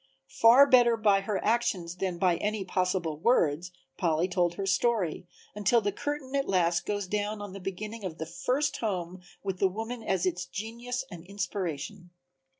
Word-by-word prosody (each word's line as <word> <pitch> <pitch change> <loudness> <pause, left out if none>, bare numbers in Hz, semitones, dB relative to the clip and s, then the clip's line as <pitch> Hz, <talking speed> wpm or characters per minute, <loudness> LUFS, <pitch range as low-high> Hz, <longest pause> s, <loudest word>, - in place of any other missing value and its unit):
Far 240 +5 +7
better 245 -4 +5
by 205 -3 +3
her 195 0 -2
actions 200 -7 0
than 185 -2 -2
by 175 -1 +2
any 210 -1 -2
possible 180 -4 -1
words 170 - +2 0.3
Polly 165 0 +2
told 175 -2 +1
her 195 - -3
story, 195 -4 0 0.3
until 210 +4 +3
the 205 -2 -1
curtain 285 +4 -4
at 275 0 0
last 170 -2 +2
goes 205 -1 -1
down 210 +2 -2
on 205 -2 -7
the 195 - -7
beginning 210 +4 -6
of 175 -4 -5
the 160 - -4
first 255 - -1
home 185 -4 -3 0.2
with 190 -2 -3
the 195 - +4
woman 225 +5 -5
as 190 -5 0
its 180 0 -1
genius 240 +6 -5
and 170 -2 -9
inspiration. 185 -2 -4
195 Hz, 170 wpm, -29 LUFS, 180-225 Hz, 0.3 s, Far